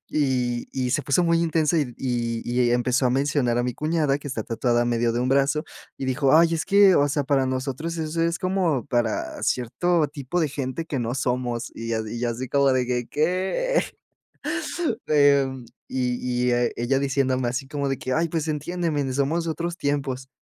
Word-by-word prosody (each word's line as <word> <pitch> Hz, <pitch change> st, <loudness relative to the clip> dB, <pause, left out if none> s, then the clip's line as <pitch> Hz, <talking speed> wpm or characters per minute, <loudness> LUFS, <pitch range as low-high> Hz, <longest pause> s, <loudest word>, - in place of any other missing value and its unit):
Y 125 Hz, -5 st, 0 dB
y 130 Hz, -2 st, -2 dB
se 145 Hz, -, +1 dB
puso 140 Hz, +5 st, +2 dB
muy 170 Hz, -1 st, +3 dB
intensa, 165 Hz, 0 st, +1 dB
y 130 Hz, -5 st, -2 dB
y 120 Hz, -3 st, -2 dB
y 120 Hz, 0 st, +1 dB
empezó 125 Hz, +2 st, +1 dB
a -, -, +4 dB
mencionar 135 Hz, -2 st, +1 dB
a 120 Hz, -, +1 dB
mi 125 Hz, 0 st, -2 dB
cuñada 155 Hz, -1 st, 0 dB
que 145 Hz, -, -8 dB
está 125 Hz, -5 st, -3 dB
tatuada 120 Hz, +1 st, +1 dB
medio 120 Hz, -1 st, +1 dB
de 120 Hz, -, 0 dB
un 125 Hz, -, 0 dB
brazo, 140 Hz, +3 st, +2 dB, 0.3 s
y -, -, -6 dB
dijo: 135 Hz, +2 st, +3 dB
"¡Ay! 165 Hz, 0 st, +4 dB
Es 160 Hz, -, -1 dB
que, 200 Hz, -1 st, +6 dB
o 145 Hz, -, +4 dB
sea, 145 Hz, 0 st, 0 dB
para 135 Hz, -1 st, +2 dB
nosotros 135 Hz, +6 st, -3 dB
eso 160 Hz, +1 st, -2 dB
es 170 Hz, +1 st, +1 dB
como 185 Hz, -, 0 dB
para 115 Hz, -, -1 dB
cierto 155 Hz, +7 st, +1 dB
tipo 140 Hz, +4 st, -3 dB
de 155 Hz, -, +1 dB
gente 135 Hz, +2 st, -3 dB
que 145 Hz, -5 st, -3 dB
no 120 Hz, +1 st, -2 dB
somos". 125 Hz, -2 st, -2 dB
Y 115 Hz, -, -7 dB
yo 110 Hz, -1 st, -1 dB
y 115 Hz, +2 st, -5 dB
yo 120 Hz, 0 st, 0 dB
así 125 Hz, +3 st, -5 dB
como 140 Hz, 0 st, +3 dB
de 130 Hz, -1 st, +1 dB
que, 125 Hz, -1 st, -2 dB
¿que? 190 Hz, -, 0 dB, 2.1 s
Y 125 Hz, -1 st, -1 dB
y -, -, +3 dB
e 120 Hz, 0 st, +1 dB
ella 120 Hz, +3 st, +1 dB
diciéndome 130 Hz, -2 st, 0 dB
así 130 Hz, +3 st, -3 dB
como 140 Hz, 0 st, -2 dB
de 135 Hz, -, -2 dB
que: 130 Hz, -, -4 dB
"Ay, 165 Hz, +5 st, +1 dB
pues, 165 Hz, -1 st, -2 dB
entiéndeme, 155 Hz, -2 st, -2 dB
somos 145 Hz, +5 st, 0 dB
de 165 Hz, -, -2 dB
otros 170 Hz, +2 st, -3 dB
tiempos". 140 Hz, -3 st, -2 dB
135 Hz, 195 wpm, -24 LUFS, 125-155 Hz, 2.1 s, que